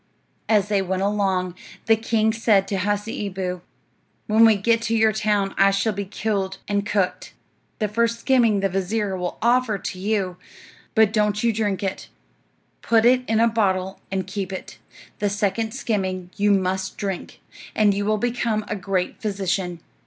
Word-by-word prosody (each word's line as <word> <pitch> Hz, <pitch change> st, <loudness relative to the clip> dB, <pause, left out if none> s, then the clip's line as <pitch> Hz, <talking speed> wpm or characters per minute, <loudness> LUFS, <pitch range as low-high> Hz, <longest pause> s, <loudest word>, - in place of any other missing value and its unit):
As 210 Hz, -3 st, +3 dB
they 205 Hz, -2 st, +1 dB
went 190 Hz, 0 st, -1 dB
along, 190 Hz, -3 st, 0 dB, 0.3 s
the 225 Hz, -, +5 dB
king 220 Hz, 0 st, +1 dB
said 215 Hz, -4 st, +2 dB
to 195 Hz, -, -2 dB
Hasseeboo, 195 Hz, -2 st, -2 dB, 0.6 s
"When 220 Hz, +2 st, +5 dB
we 220 Hz, -1 st, +6 dB
get 230 Hz, +3 st, +2 dB
to 230 Hz, 0 st, 0 dB
your 220 Hz, -1 st, +4 dB
town 205 Hz, -2 st, 0 dB
I 195 Hz, 0 st, +6 dB
shall 200 Hz, +3 st, 0 dB
be 200 Hz, 0 st, -4 dB
killed 195 Hz, -1 st, -2 dB
and 205 Hz, 0 st, -1 dB
cooked. 195 Hz, -3 st, -1 dB, 0.4 s
The 215 Hz, -, 0 dB
first 230 Hz, +2 st, 0 dB
skimming 230 Hz, -7 st, +3 dB
the 195 Hz, -, +1 dB
vizir 195 Hz, +2 st, -1 dB
will 180 Hz, -1 st, -4 dB
offer 240 Hz, -2 st, +3 dB
to 185 Hz, -, -6 dB
you, 195 Hz, -3 st, -1 dB, 0.6 s
but 220 Hz, -1 st, +4 dB
don't 210 Hz, -1 st, +1 dB
you 230 Hz, -1 st, +3 dB
drink 205 Hz, -3 st, -1 dB
it; 190 Hz, -1 st, -4 dB, 0.7 s
put 230 Hz, -1 st, +3 dB
it 250 Hz, +1 st, +5 dB
in 220 Hz, 0 st, +2 dB
a 230 Hz, -, +5 dB
bottle 190 Hz, -4 st, 0 dB
and 190 Hz, -1 st, -1 dB
keep 190 Hz, 0 st, -4 dB
it. 190 Hz, -, -8 dB, 0.4 s
The 205 Hz, -, +1 dB
second 205 Hz, +2 st, -1 dB
skimming 190 Hz, -7 st, -2 dB
you 205 Hz, +1 st, +2 dB
must 190 Hz, -1 st, 0 dB
drink, 195 Hz, -3 st, -5 dB, 0.4 s
and 210 Hz, -2 st, +4 dB
you 200 Hz, +1 st, -1 dB
will 215 Hz, +1 st, +1 dB
become 230 Hz, -2 st, -1 dB
a 210 Hz, -, -2 dB
great 190 Hz, -2 st, -2 dB
physician. 190 Hz, -4 st, -2 dB
205 Hz, 165 wpm, -23 LUFS, 190-220 Hz, 0.7 s, we